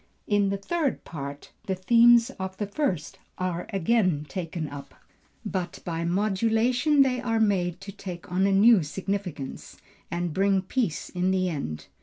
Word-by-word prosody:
In 205 Hz, -1 st, +2 dB
the 200 Hz, -, -1 dB
third 300 Hz, -, -1 dB
part, 140 Hz, -2 st, -7 dB, 0.2 s
the 190 Hz, -, 0 dB
themes 235 Hz, +5 st, +5 dB
of 190 Hz, 0 st, -5 dB
the 205 Hz, -, -2 dB
first 200 Hz, -, -2 dB, 0.2 s
are 180 Hz, -1 st, -2 dB
again 190 Hz, -6 st, +1 dB
taken 165 Hz, -3 st, -4 dB
up, 145 Hz, -1 st, -9 dB, 0.5 s
but 185 Hz, -2 st, -3 dB
by 170 Hz, -1 st, -2 dB
modulation 225 Hz, -, +2 dB
they 250 Hz, -2 st, 0 dB
are 225 Hz, -3 st, 0 dB
made 185 Hz, -5 st, +1 dB
to 200 Hz, 0 st, -7 dB
take 180 Hz, -3 st, -8 dB
on 190 Hz, +2 st, +2 dB
a -, -, +2 dB
new 205 Hz, +1 st, +6 dB
significance, 180 Hz, -3 st, -5 dB, 0.3 s
and 175 Hz, -1 st, -2 dB
bring 195 Hz, +1 st, +2 dB
peace 195 Hz, -, -2 dB
in 180 Hz, +1 st, 0 dB
the 185 Hz, -1 st, +1 dB
end. 80 Hz, -, -4 dB
190 Hz, 155 wpm, -26 LUFS, 175-220 Hz, 0.5 s, new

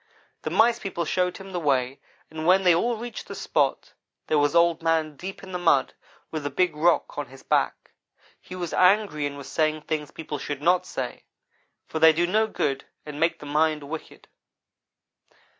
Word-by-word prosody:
The -, -, -3 dB
Mice 235 Hz, +1 st, +3 dB
people 180 Hz, -4 st, -3 dB
showed 180 Hz, +2 st, 0 dB
him 195 Hz, 0 st, -10 dB
the 180 Hz, -, -2 dB
way, 135 Hz, -4 st, 0 dB, 0.3 s
and 160 Hz, +1 st, -4 dB
when 190 Hz, +2 st, +5 dB
they 180 Hz, -2 st, +6 dB
all 230 Hz, +8 st, +1 dB
reached 240 Hz, +2 st, -7 dB
the -, -, -7 dB
spot -, -, -1 dB, 0.3 s
there 155 Hz, -, +2 dB
was 145 Hz, 0 st, +2 dB
Old 170 Hz, -1 st, +4 dB
man 160 Hz, -2 st, +1 dB
deep 190 Hz, +7 st, -8 dB
in 190 Hz, -, -9 dB
the 180 Hz, -, -3 dB
mud, 165 Hz, -6 st, +3 dB, 0.4 s
with 155 Hz, -, -3 dB
the 145 Hz, -, -3 dB
big 170 Hz, +3 st, +1 dB
rock 165 Hz, 0 st, +1 dB
on 145 Hz, -, -4 dB
his 135 Hz, +2 st, -15 dB
back. -, -, 0 dB, 0.5 s
He 185 Hz, -, -10 dB
was 175 Hz, -3 st, -4 dB
angry 185 Hz, -6 st, +3 dB
and 140 Hz, 0 st, -7 dB
was 140 Hz, -, -9 dB
saying 155 Hz, -1 st, 0 dB
things 150 Hz, -2 st, -3 dB
people 150 Hz, -2 st, -6 dB
should 145 Hz, 0 st, -4 dB
not 180 Hz, +2 st, +3 dB
say, -, -, -5 dB, 0.6 s
for 160 Hz, -, -4 dB
they 160 Hz, 0 st, +7 dB
do 170 Hz, +2 st, +1 dB
no 215 Hz, +5 st, +2 dB
good 135 Hz, -9 st, -2 dB, 0.2 s
and 150 Hz, -1 st, -7 dB
make 165 Hz, +1 st, +2 dB
the -, -, -11 dB
mind 155 Hz, +1 st, +1 dB
wicked. 155 Hz, +3 st, -8 dB
160 Hz, 190 wpm, -25 LUFS, 150-180 Hz, 0.6 s, they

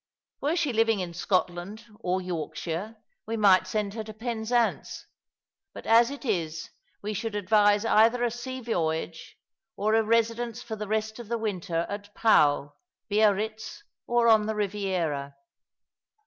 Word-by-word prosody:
Were 300 Hz, +4 st, +1 dB
she 305 Hz, -7 st, 0 dB
living 225 Hz, -1 st, +2 dB
in 175 Hz, -2 st, -4 dB
Scotland 185 Hz, +4 st, -2 dB
or 185 Hz, +1 st, -1 dB
Yorkshire 170 Hz, +4 st, -4 dB, 0.3 s
we 225 Hz, +1 st, -2 dB
might 190 Hz, -3 st, +5 dB
send 205 Hz, 0 st, -2 dB
her 220 Hz, 0 st, -4 dB
to 215 Hz, 0 st, -9 dB
Penzance; 235 Hz, +1 st, -1 dB, 0.7 s
but -, -, -9 dB
as 230 Hz, +2 st, +5 dB
it 280 Hz, 0 st, -8 dB
is 165 Hz, -7 st, -2 dB, 0.3 s
we 210 Hz, +1 st, -3 dB
should 215 Hz, +1 st, -4 dB
advise 205 Hz, +1 st, +3 dB
either 230 Hz, +2 st, +4 dB
a 240 Hz, -, +1 dB
sea 255 Hz, +2 st, -6 dB
voyage, 165 Hz, -7 st, -3 dB, 0.4 s
or 215 Hz, +2 st, 0 dB
a 225 Hz, -, +5 dB
residence 230 Hz, +2 st, 0 dB
for 225 Hz, -2 st, -5 dB
the 210 Hz, -1 st, -6 dB
rest 220 Hz, +1 st, -2 dB
of 235 Hz, -, -8 dB
the 235 Hz, +1 st, -1 dB
winter 180 Hz, -6 st, -2 dB
at 205 Hz, 0 st, -7 dB
Pau^ 145 Hz, -9 st, +3 dB, 0.4 s
Biarritz, 215 Hz, +1 st, 0 dB, 0.2 s
or 240 Hz, -1 st, +3 dB
on 220 Hz, -2 st, +5 dB
the 220 Hz, -, -1 dB
Eiviera. 185 Hz, -9 st, -2 dB
215 Hz, 150 wpm, -27 LUFS, 185-230 Hz, 0.7 s, might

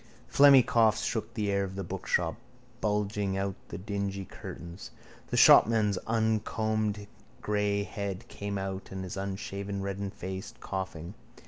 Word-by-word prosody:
Phlegmy 140 Hz, -3 st, +7 dB
coughs 110 Hz, -2 st, +3 dB
shook 115 Hz, -1 st, -2 dB
the 105 Hz, -3 st, 0 dB
air 100 Hz, 0 st, +1 dB
of 95 Hz, -1 st, -5 dB
the 95 Hz, -, -3 dB
bookshop, 90 Hz, -1 st, -1 dB, 0.5 s
bulging 105 Hz, -2 st, 0 dB
out 100 Hz, 0 st, -1 dB
the -, -, -6 dB
dingy 100 Hz, 0 st, -3 dB
curtains. 85 Hz, +1 st, -9 dB, 0.4 s
The -, -, -2 dB
shopman's 105 Hz, -3 st, +6 dB
uncombed 110 Hz, -1 st, 0 dB, 0.4 s
grey 105 Hz, -1 st, +1 dB
head 100 Hz, -2 st, -5 dB
came 100 Hz, 0 st, -4 dB
out 95 Hz, 0 st, -4 dB
and 95 Hz, 0 st, -5 dB
his 90 Hz, -, -6 dB
unshaven 100 Hz, 0 st, -4 dB
reddened 100 Hz, 0 st, -4 dB
face, 95 Hz, +2 st, -6 dB
coughing. 95 Hz, -2 st, -5 dB
100 Hz, 135 wpm, -29 LUFS, 95-105 Hz, 0.5 s, Phlegmy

